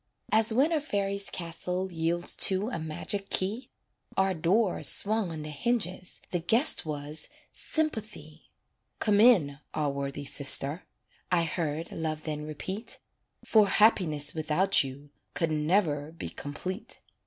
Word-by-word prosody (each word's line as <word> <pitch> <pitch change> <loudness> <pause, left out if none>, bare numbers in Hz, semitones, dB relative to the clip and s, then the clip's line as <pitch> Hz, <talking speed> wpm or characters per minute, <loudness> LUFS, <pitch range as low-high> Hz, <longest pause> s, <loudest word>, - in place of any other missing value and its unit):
As 220 +1 +4
when 270 +8 +2
a 315 -2 +1
fairy's 200 -6 -2
castle 180 +2 -4
Yields 170 +1 -1
to 195 +3 +4
a 170 - -3
magic 175 +5 -5
key, 210 +7 -2 0.5
Our 190 0 +2
door 185 +5 +1
swung 215 -3 +2
on 155 -2 -6
the 150 - -6
hinges 185 - -2
The 175 - 0
guest 225 - +2
was 150 0 -4 0.2
Sympathy. 215 - -3 0.5
"Come 205 -2 +2
in, 180 - +5 0.2
our 150 -2 0
worthy 140 +1 -5
sister," 140 +3 +4 0.4
I 175 -2 +3
heard 160 -1 -3
Love 155 -1 -4
then 150 -1 -5
repeat; 190 - -4 0.5
"For 215 -2 +4
happiness 165 -10 +4
without 160 +4 +2
you 140 +2 -10 0.2
Could 165 -2 0
never 155 -1 0
be 165 - -7
complete." 185 +8 -6
175 Hz, 130 wpm, -28 LUFS, 150-205 Hz, 0.5 s, in